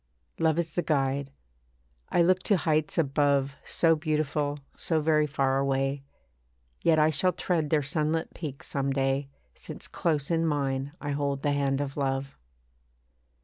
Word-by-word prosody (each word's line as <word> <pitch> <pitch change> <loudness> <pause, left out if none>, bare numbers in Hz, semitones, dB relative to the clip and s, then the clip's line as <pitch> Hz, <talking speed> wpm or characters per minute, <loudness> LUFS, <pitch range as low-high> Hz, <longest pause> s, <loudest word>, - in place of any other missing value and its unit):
Love 160 -1 +2
is 165 -2 -1
the 175 - +1
guide. 140 -3 0 0.8
I 175 - +3
look 185 +2 +4
to 205 - +4
heights 155 -2 0
above 140 -2 +2
So 165 -1 +3
beautiful, 150 -2 -1 0.2
so 160 -2 0
very 155 -1 +2
far 135 -2 +1
away; 135 0 0 0.8
Yet 165 -2 +4
I 155 0 +4
shall 180 +5 +2
tread 160 -5 -1
their 150 -1 +2
sunlit 155 +3 -1
peaks 145 -5 -6
some 140 -1 -1
day, 135 0 0 0.2
Since - - -8
close 150 -2 -1
in 165 0 +2
mine 140 -3 -1
I 145 - -4
hold 140 -1 -1
the 145 - +2
hand 140 -1 +1
of 140 0 -4
love. 135 0 -1
145 Hz, 150 wpm, -28 LUFS, 140-160 Hz, 0.8 s, look